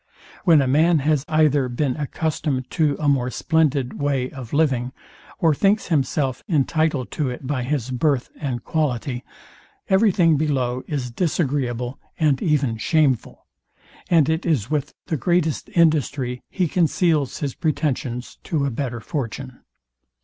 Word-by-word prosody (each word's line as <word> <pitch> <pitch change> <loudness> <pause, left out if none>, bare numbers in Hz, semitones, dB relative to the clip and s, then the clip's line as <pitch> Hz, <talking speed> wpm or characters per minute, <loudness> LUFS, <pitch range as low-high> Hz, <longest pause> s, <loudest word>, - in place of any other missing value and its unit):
When 160 -6 +6
a - - -1
man 160 +5 +4
has 150 -3 +2
either 150 -4 +3
been 125 +1 -1
accustomed 150 -3 -2
to 150 -4 +1
a 150 - -1
more 130 -3 +2
splendid 145 -2 0
way 135 -3 0
of 130 -4 -9
living, 130 -5 +1 0.4
or 160 -2 +3
thinks 200 +8 +1
himself 135 -3 0
intitled 155 -3 +1
to 145 -4 -1
it 125 +2 -7
by 135 -1 -1
his 130 -1 -2
birth 130 0 0
and 125 -5 -3
quality, 130 -5 -1 0.7
every 195 +2 +4
thing 165 -5 +3
below 130 -4 0
is 130 -5 -3
disagreeable 130 -5 -1 0.2
and 150 -5 +2
even 140 -7 +1
shameful; 140 -1 0 0.6
and 160 -5 +4
it 160 +1 0
is 145 - 0
with 150 -3 -2
the 160 - -2
greatest 165 +1 0
industry 145 -6 +2
he 185 -3 0
conceals 160 -4 +1
his 140 -3 -3
pretensions 130 -6 -2
to 150 -4 0
a 140 - -1
better 120 -2 -3
fortune. 130 -3 -5
145 Hz, 140 wpm, -22 LUFS, 130-160 Hz, 0.7 s, When